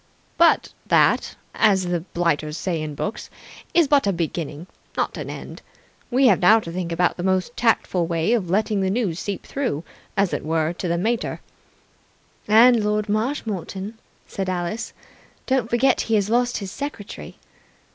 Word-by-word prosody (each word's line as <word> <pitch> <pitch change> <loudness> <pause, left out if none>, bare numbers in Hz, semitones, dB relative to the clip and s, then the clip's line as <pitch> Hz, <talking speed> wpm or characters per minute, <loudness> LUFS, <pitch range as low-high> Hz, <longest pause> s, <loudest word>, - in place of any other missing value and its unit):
" - - -37
But - - +2
that, - - +3 0.2
as 200 -4 +3
the 175 -1 0
blighters 165 -3 -1
say 170 -4 -2
in 150 -1 -5
books, 210 +9 -4 0.4
is 340 -4 +4
but 280 -6 +3
a - - +3
beginning, 165 -2 -4 0.3
not - - 0
an - - -6
end. - - -8 0.5
We 265 +2 +3
have 245 - +5
now 215 +5 +6
to 170 -6 -7
think 170 -1 -4
out 180 - +2
the - - -4
most 190 +5 0
tactful 190 -7 +1
way 165 +6 +1
of 200 -8 0
letting 205 +1 +1
the 190 - +1
news 195 -6 -1
seep 200 -2 -4
through, 250 - -2 0.3
as 195 -2 +2
it - - -2
were, 160 +1 0
to 180 - -4
the 170 0 0
mater." 225 +6 -1 1.1
"And 230 +2 +6
Lord 210 0 0
Marshmoreton," 215 - -3 0.3
said 195 -2 -4
Alice. 180 +4 -3 0.5
"Don't 260 -4 0
forget 240 +3 +3
he 225 - 0
has 205 0 +1
lost 245 +1 +2
his 195 -3 -6
secretary." 275 -7 -7
195 Hz, 165 wpm, -23 LUFS, 175-230 Hz, 1.1 s, now